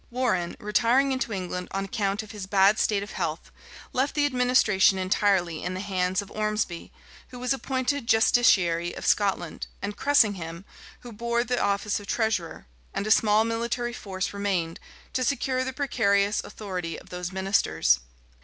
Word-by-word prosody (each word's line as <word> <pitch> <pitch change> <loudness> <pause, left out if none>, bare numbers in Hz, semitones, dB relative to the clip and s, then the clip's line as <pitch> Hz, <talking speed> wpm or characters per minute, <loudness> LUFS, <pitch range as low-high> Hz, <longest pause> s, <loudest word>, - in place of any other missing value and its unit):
Warrenne, 230 -9 -1
retiring 245 +6 +2
into 260 -3 -2
England 180 -2 -4
on 195 0 -3
account 200 -1 -1
of 215 - -11
his 205 -3 -7
bad 195 +2 +4
state 200 -2 +1
of 205 - -9
health, - - -4 0.4
left 265 +3 0
the 295 -1 +3
administration 250 -7 +3
entirely 185 -3 +1
in 180 +1 -3
the - - -4
hands 190 -1 -1
of 200 - -15
Ormesby, 215 -5 -2 0.4
who 250 - -11
was 250 +2 0
appointed 265 -1 -2
justiciary 190 -7 +3
of - - -6
Scotland, 195 -5 0
and 205 +1 -4
Cressingham, 200 - +1 0.4
who 245 - -10
bore 235 +2 -1
the 245 0 -1
office 200 +1 0
of 205 - -12
treasurer; 220 -8 -1 0.3
and 200 - -1
a 215 - -1
small 215 -1 +5
military 235 +1 -2
force 190 -4 -4
remained, 190 -5 -2 0.3
to 255 - 0
secure 255 0 0
the 260 - -3
precarious 210 -7 +1
authority 180 -5 -5
of - - -14
those 180 0 -5
ministers. 190 - +2
205 Hz, 160 wpm, -26 LUFS, 190-240 Hz, 0.4 s, small